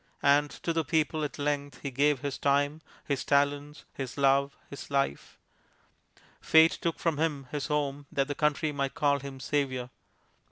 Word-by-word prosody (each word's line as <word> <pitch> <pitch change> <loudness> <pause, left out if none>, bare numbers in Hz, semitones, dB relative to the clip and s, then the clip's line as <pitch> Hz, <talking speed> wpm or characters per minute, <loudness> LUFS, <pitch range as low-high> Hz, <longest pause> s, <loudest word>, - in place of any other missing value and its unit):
And 145 +1 +4
to 165 - 0
the 165 0 +1
people 155 0 0
at 145 - -4
length 145 -2 -2
he 140 - -3
gave 140 +1 +2
his 140 -1 -4
time, 145 +2 +1 0.2
his 140 -3 -1
talents, 145 +1 0
his 130 -1 -6
love, 140 0 +2
his 140 - -9
life. 140 - -1 1.0
Fate 160 +1 +6
took 170 -1 -1
from 160 -3 -1
him 150 -4 -1
his 145 -2 -3
home 145 -2 -2
that 135 -1 0
the 145 - -2
country 150 +1 +1
might 140 -2 -2
call 140 -1 +2
him 135 -1 -8
savior. 130 -3 -2
145 Hz, 165 wpm, -29 LUFS, 140-150 Hz, 1.0 s, Fate